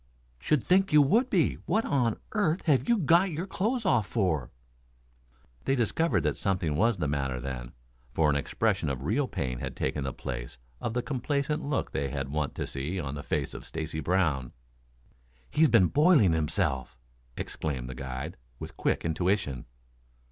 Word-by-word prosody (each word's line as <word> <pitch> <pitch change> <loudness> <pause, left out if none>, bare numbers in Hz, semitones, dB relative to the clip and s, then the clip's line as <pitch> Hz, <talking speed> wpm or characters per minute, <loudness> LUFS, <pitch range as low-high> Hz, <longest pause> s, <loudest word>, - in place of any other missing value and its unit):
"Should 150 - +1
think 190 +1 +3
you 150 - +7
would 225 - +3
he. 175 -6 +2
What 220 +1 +2
on 125 -6 +1
earth 185 -5 +1
have 150 - +2
you 235 - +5
got 175 +2 +4
your 165 +2 -3
clothes 225 +5 -1
off 120 - +3
for?" 85 - 0 1.2
They 135 - +2
discovered 140 +7 +1
that - - 0
something 90 -6 0
was 115 +6 +2
the 75 -4 -1
matter 70 -3 -1
then, 60 -1 -6 0.4
for 75 +4 +2
an 75 - +3
expression 95 +3 0
of 65 -1 -3
real 125 - +1
pain 60 - -3
had - - -5
taken 75 - -2
the 65 - -2
place - - -6 0.2
of 115 - -3
the 125 - 0
complacent 140 +2 -1
look 140 -1 -1
they 70 0 -1
were 70 -1 -2
wont 75 -1 -2
to - - -2
see 75 +8 -3
on 70 -5 -4
the 70 - -5
face - - -2
of - - -8
Stacy 80 -1 -5
Brown. 75 -6 0 1.0
"He's 155 0 +4
been 110 -6 +6
boiling 145 - +5
himself!" 75 -5 -1 0.4
exclaimed 65 -6 -4
the 65 - -6
guide, 65 0 -6 0.2
with - - -9
quick - - 0
intuition. 80 -5 0
95 Hz, 170 wpm, -28 LUFS, -, 1.2 s, you